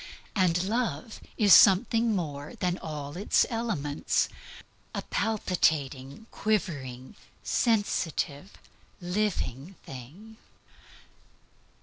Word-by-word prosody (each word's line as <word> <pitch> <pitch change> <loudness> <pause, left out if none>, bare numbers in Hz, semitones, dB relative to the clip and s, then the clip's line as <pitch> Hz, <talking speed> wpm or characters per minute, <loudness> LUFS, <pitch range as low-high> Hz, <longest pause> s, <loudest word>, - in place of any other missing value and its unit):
And 180 -3 +2
love 215 - -2 0.2
is 205 -4 +6
something 225 +4 +6
more 145 -5 -4
than 180 0 -1
all 150 -3 -6
its 195 +4 +2
elements 190 -12 -1 0.7
a - - -3
palpitating, 155 -7 -1
quivering, 140 - -2 0.3
sensitive, 190 - 0 0.5
living 180 - -2
thing. 160 - -11
180 Hz, 75 wpm, -28 LUFS, 145-215 Hz, 0.7 s, is